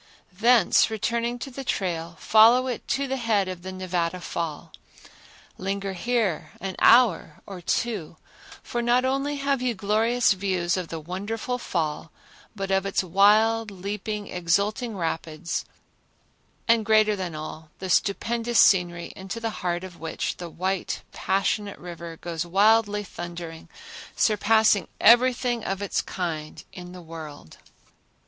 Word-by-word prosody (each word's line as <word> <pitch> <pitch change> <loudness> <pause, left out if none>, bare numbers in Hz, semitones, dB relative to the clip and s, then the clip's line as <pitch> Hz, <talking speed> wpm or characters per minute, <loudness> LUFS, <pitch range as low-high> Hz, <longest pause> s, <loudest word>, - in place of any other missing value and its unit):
Thence 225 +1 +4
returning 235 +2 -1
to 270 +3 -7
the 270 +2 -7
trail, 170 -7 -3
follow 230 +4 +6
it 250 -3 -4
to 280 - 0
the 265 0 -2
head 220 -5 +1
of 185 -1 -6
the 190 +1 -6
Nevada 180 -2 -2
Fall. 165 -3 -5 0.9
Linger 195 +1 -3
here 215 -4 -1
an 190 0 -5
hour 225 -10 +4
or 190 -3 -8
two, 185 -4 -2 0.5
for 240 - -3
not 240 +2 +2
only 275 +2 0
have 275 -2 0
you 250 -2 0
glorious 220 +4 +2
views 185 -3 -1
of 185 -3 -3
the 165 - -5
wonderful 205 +9 -4
fall, 160 -5 -3 0.4
but 195 -1 -4
of 190 0 +2
its 195 - 0
wild, 210 +5 +4
leaping, 205 +2 -5
exulting 200 +6 -1
rapids 165 -1 -3 1.0
and, 230 -1 +4
greater 215 -1 +4
than 180 -4 -5
all, 155 0 -8
the 190 - -6
stupendous 230 +5 +1
scenery 175 -3 +3
into 195 +4 -6
the 225 -1 -2
heart 175 0 -1
of 180 -2 -10
which 160 0 -3
the 175 -1 -7
white 185 +2 -3
passionate 200 +1 -1
river 170 -1 -8
goes 165 -1 -4
wildly 210 +3 +3
thundering, 170 -3 -8 0.5
surpassing 215 -1 +3
everything 240 0 +4
of 195 0 -2
its 200 -1 -1
kind 160 -4 -5
in 180 -1 -9
the 180 -1 -10
world. 155 - -10
195 Hz, 140 wpm, -25 LUFS, 175-225 Hz, 1.0 s, follow